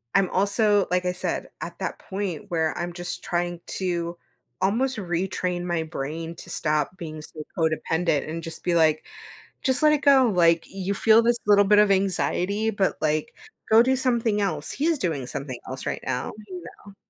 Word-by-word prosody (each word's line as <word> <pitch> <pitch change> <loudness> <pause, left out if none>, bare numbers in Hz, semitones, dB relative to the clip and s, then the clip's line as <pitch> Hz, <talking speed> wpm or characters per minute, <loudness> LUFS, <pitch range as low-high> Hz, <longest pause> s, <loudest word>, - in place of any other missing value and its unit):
I'm 195 -2 +4
also 205 +1 +2
like 180 0 +1
I 180 - +2
said, - - -2
at - - -7
that - - -4
point 195 -1 -4
where 160 -3 0
I'm 175 0 -3
just 175 0 -5
trying 175 0 -2 0.2
to 175 -2 -2 0.4
almost 235 +7 +1
retrain 180 -1 -2
my 175 -2 -1
brain 160 +2 -5
to - - -10
stop 155 +3 0
being 155 -3 -7
so 155 0 -9
codependent 160 -1 0
and 165 +1 -5
just 165 - -4
be 175 -1 +1
like, 155 -2 +3 0.6
"Just 265 +2 +1
let 305 - +7
it 295 - +1
go, 270 -3 +6
like, 170 -1 +4
you 195 0 -3
feel 220 +3 +5
this 235 0 +3
little 205 -1 +6
bit 210 +1 +5
of 210 -1 +5
anxiety, 195 +2 +1
but, 200 -2 0
like, 155 0 0 0.4
go 225 +1 +8
do 260 +1 +2
something 235 -5 +1
else. 155 -6 -1
He's 320 +2 +1
doing 155 - -2
something 130 -3 -5
else 130 +1 -6
right - - -3
now." 125 - -2 0.2
You 180 -3 -8 0.2
know? 200 - -13
180 Hz, 185 wpm, -25 LUFS, 165-205 Hz, 0.6 s, go